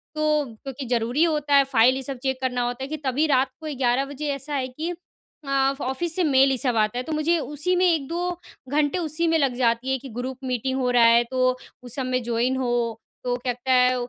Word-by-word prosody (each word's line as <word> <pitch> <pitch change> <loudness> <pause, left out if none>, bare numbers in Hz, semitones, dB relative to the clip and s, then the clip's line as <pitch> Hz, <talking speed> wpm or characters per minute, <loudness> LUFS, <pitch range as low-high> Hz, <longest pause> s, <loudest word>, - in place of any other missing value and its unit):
तो 305 -1 +1 0.2
क्योंकि 270 0 -6
ज़रूरी 240 +5 +1
होता 300 -3 +1
है, 275 - +7
फ़ाइल 255 -1 +4
ये 265 - -3
सब 270 0 -5
चेक 265 -1 -1
करना 250 -1 -1
होता 245 +2 -4
है - - -4
कि 310 +1 -4
तभी 270 +5 +2
रात 265 -1 +3
को 305 -3 -5
11 255 +1 +2
बजे 285 +2 -6
ऐसा 275 +2 -6
है 260 -2 -1
कि 310 +7 -5 0.6
अ, 275 0 +2
ऑफ़िस 310 +6 -2
से 365 - +1
मेल 270 -2 +4
ये 260 - 0
सब 245 -2 0
आता 215 +2 +1
है 250 - -2
तो 320 - -7
मुझे 320 +3 +2
उसी 300 +5 -1
में 365 +1 +3
1-2 340 +2 0 0.4
घंटे 295 +4 +1
उसी 335 0 -1
में 325 0 +3
लग 265 -3 +1
जाती 245 +1 +1
है 265 - +1
कि 270 0 -10
ग्रुप 255 +1 -4
मीटिंग 260 +1 -1
हो 250 -1 +1
रहा 240 -1 +5
है, 235 +1 +6
तो 255 +1 0 0.3
उस 245 -1 -6
सब 265 -2 -2
में 255 0 0
जॉइन 240 +2 0
हो। 240 -3 -1 0.2
तो 245 0 0
कहता 250 +1 -2
है 250 0 +5
265 Hz, 235 wpm, -24 LUFS, 250-295 Hz, 0.6 s, है